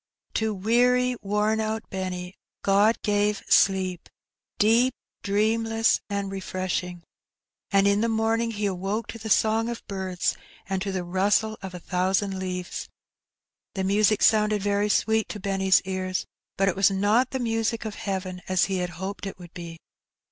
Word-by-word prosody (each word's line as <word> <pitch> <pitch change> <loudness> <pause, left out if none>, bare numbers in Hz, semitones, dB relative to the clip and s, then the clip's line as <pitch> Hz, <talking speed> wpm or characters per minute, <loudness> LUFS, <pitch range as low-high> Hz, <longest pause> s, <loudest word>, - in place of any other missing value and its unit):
To 220 0 0
weary, 245 +5 +2
worn 210 +2 +1
out 220 +1 -2
Benny 185 -1 -4 0.3
God 205 +3 +4
gave 205 -1 +1
sleep, 185 -2 +2 0.5
deep, 235 +4 +4 0.3
dreamless, 225 +2 +1
and 200 -1 -2
refreshing, 185 -2 -3 0.7
and 195 0 +4
in 200 +1 +3
the 230 - +1
morn 225 +1 +1
ing 230 - -1
he 210 -2 -3
awoke 195 +3 -2
to 230 - -7
the 220 0 -6
song 220 +2 +3
of 235 - -6
birds 190 -2 -2 0.3
and 190 -1 -2
to 195 0 -2
the 185 -2 -2
rustle 200 +5 +1
of 190 -2 -7
a - - -6
thousand 190 +2 0
leaves. 180 -1 -4 0.9
The 190 - -1
music 205 +2 +3
sounded 210 -2 +3
very 205 0 +1
sweet 220 +2 +2
to 210 - -5
Benny's 195 -1 +2
ears, 185 0 -2 0.3
but 195 - +2
it 185 - +1
was 195 +1 +4
not 205 +6 +2
the 265 - -3
music 225 -1 -1
of 215 - -4
heaven, 190 -3 -4
as 185 -1 +3
he 195 -1 -2
had 180 -1 -2
hoped 195 +2 -5
it 195 - -7
would 175 -1 -13
be. 170 -2 -8
200 Hz, 160 wpm, -25 LUFS, 190-220 Hz, 0.9 s, God